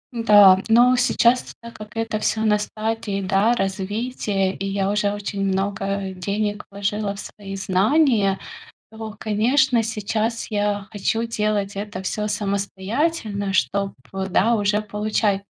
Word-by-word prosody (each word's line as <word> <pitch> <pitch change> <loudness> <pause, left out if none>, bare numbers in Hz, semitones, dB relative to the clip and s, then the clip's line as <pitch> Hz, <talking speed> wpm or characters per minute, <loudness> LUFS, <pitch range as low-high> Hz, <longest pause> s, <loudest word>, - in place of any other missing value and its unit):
Да, 205 -4 +7
но 240 +3 +6
сейчас, 245 0 +2
так 235 0 -11
как 215 +1 -11
это 225 -1 -1
всё 220 +1 0
на 210 -1 +3
стадии, 215 -1 -3
да, 195 +4 +2
развития, 195 0 -2
и - - -6
я 195 0 0
уже 205 0 +1
очень 200 -1 -4
много 195 0 -1
денег 205 +3 -3
вложила 200 +1 -2
в - - -10
свои 195 -2 -8
знания, 200 +2 +2 0.5
то, 220 -1 -8
конечно, 235 +3 +2
сейчас 225 +1 -2
я 205 -1 -1
хочу 225 +2 -1
делать 210 -3 -1
это 200 -2 -5
всё 210 +2 -2
самостоятельно, 205 - -2
чтоб, 200 +1 0 0.4
да, 230 +6 +3
уже 205 0 +1
получать 210 -1 -1
210 Hz, 130 wpm, -22 LUFS, 195-225 Hz, 0.5 s, Да